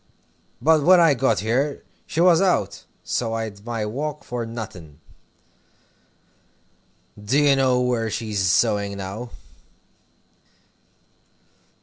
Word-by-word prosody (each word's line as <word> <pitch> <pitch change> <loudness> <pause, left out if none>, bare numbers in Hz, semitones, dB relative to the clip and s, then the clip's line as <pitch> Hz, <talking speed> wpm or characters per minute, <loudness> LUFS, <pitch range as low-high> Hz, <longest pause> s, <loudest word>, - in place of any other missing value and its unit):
But 160 0 +3
when 180 +5 +6
I 165 -3 +5
got 120 -5 +1
there, 130 +7 -1 0.2
she 160 - -4
was 175 -1 +5
out, 105 - 0 0.2
so 115 -2 -2
I'd 110 -3 -6
my 115 -2 -3
walk 145 +7 -4
for 120 -2 -5
nothing. 90 -10 -9 2.2
Do 110 +7 +1
you 145 -2 +4
know 130 -2 +2
where 120 -3 0
she's 110 -2 -3
sewing 100 +2 +1
now?" 100 +5 -6
120 Hz, 105 wpm, -22 LUFS, 105-140 Hz, 2.2 s, when